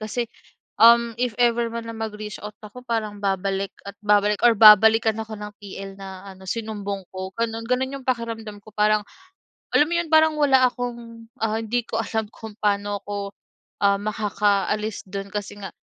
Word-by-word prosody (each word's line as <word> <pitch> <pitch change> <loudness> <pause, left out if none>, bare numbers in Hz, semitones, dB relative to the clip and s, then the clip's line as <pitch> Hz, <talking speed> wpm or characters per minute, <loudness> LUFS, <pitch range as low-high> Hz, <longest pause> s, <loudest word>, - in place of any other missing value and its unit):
kasi, 220 +3 -2 0.5
um, 235 0 +6
if 245 +1 -1
ever 235 -1 +2
man 230 0 -5
na 230 - -6
mag-reach 215 -2 -5
out 210 - -5
ako 225 +4 -12
parang 215 -4 -3
babalik 195 0 -1 0.2
at 200 - -7
babalik 210 0 +3
or 240 - +7
babalikan 220 +1 +7
ako 220 -1 -6
ng 210 0 -7
TL 195 -1 -9
na 195 0 -10
ano 190 - -16
sinumbong 200 -2 -4
ko 190 0 -5
gano'n. 225 0 -1
Gano'n 255 +3 0
'yong 270 -2 -9
pakiramdam 230 -4 -3
ko 215 +1 -18
parang, 210 0 +3 0.7
alam 295 - +5
mo 340 - -3
'yon 340 -1 -1
parang 315 0 +5
wala 265 -3 +5
akong, 235 -2 -6
ah, 220 -1 0
hindi 240 +2 -1
ko - - -2
alam 220 -1 -2
kung 220 -2 -10
paano 205 0 0
ako, 200 -1 -5 0.5
um, 200 0 +4
makakaalis 210 0 0
do'n 195 +1 -6
kasi 205 0 -5
nga 195 -3 -7
215 Hz, 175 wpm, -23 LUFS, 205-230 Hz, 0.7 s, or